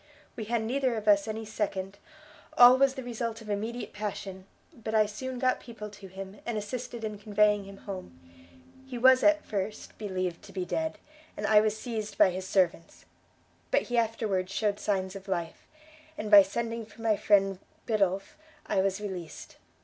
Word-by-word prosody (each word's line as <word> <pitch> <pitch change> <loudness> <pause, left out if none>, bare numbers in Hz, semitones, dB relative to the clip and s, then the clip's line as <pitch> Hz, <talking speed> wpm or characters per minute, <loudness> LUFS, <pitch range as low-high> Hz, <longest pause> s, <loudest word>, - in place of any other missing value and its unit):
We 220 - -5
had 230 0 0
neither 255 +1 0
of 215 -1 -5
us 200 0 +5
any 220 0 -4
second, 200 -2 -3 0.6
all 245 +1 +10
was 270 0 +3
the 265 - -5
result 230 -1 -4
of 215 -2 -7
immediate 225 +4 -3
passion; 195 -2 -5 0.3
but 225 -5 -5
I 215 -1 +5
soon 255 +5 -5
got 255 0 +1
people 215 -3 -9
to 200 -1 -11
him, 190 +2 -9
and 235 -2 -3
assisted 235 +2 -5
in 210 -2 -4
conveying 210 -1 +2
him 195 0 -11
home. 185 - -8 0.7
He 255 -2 -6
was 260 +1 +6
at, 310 0 +4
first 205 0 -4
believed 185 -4 -3
to - - -12
be 185 -2 -3
dead, 320 - -2 0.4
and 210 - -3
I 210 0 +6
was 215 0 0
seized 220 -3 -5
by 185 - +6
his 185 +1 -5
servants; 175 -3 0 0.6
but - - +3
he 245 - -2
afterwards 215 -5 -1
shewed 205 0 0
signs 190 -2 -1
of 195 0 -9
life, 170 -3 -4 0.5
and 215 0 -4
by 205 -1 +11
sending 230 +4 -3
for 225 +1 -13
my 220 -2 +3
friend 195 -2 +3 0.3
Biddulph, 195 -1 0 0.3
I 190 - +1
was 195 0 0
released. 180 -6 -7
210 Hz, 180 wpm, -29 LUFS, 195-230 Hz, 0.7 s, by